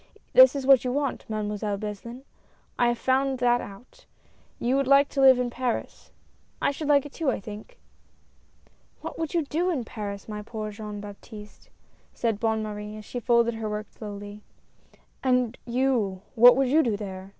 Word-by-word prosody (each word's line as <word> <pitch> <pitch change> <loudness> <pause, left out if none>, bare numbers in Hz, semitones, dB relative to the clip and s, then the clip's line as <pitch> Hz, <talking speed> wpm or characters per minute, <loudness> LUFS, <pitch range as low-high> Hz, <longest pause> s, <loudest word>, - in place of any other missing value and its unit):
That - - +8
is 275 -2 -3
what 270 -2 +6
you 250 - -1
want. 280 -3 -2
Mademoiselle 210 -1 -2
Beslin, 215 +5 -7 0.6
I 240 - +4
have 240 0 +1
found 265 +1 +1
that 245 -1 +2
out 245 - -13 0.3
— - - -35
you 245 +3 +1
would 275 -1 +1
like 280 +1 +5
to 275 - -1
live 265 -1 +8
in 250 -1 -1
Paris 250 -1 -4 0.2
— - - -38
and - - +2
I - - 0
should 290 +1 -5
like 285 -1 +4
it 290 - -10
too, 320 -5 -1
I - - -1
think." 210 +2 -10 0.6
" - - -36
What - - -7
would 325 0 -3
you 335 - +2
do 335 +6 -1
in 295 -9 -1
Paris, 205 -4 -7
my 210 -1 -5
poor 215 0 -6
dear 205 - -11
Jean 210 -1 -6
Baptiste," 210 +1 -12 0.5
said 225 -3 -1
Bonne 220 -1 0
Marie, 210 0 -6
as 215 - -10
she 245 - -5
folded 235 0 +2
her 225 -1 -4
work 210 0 -5
slowly. 205 -1 -9 0.8
"And 250 -2 +1
you, 235 -7 0
what 245 +2 +8
would 270 -2 +2
you 310 +4 +5
do 230 -8 0
there 190 -2 -7
235 Hz, 195 wpm, -26 LUFS, 210-265 Hz, 0.8 s, That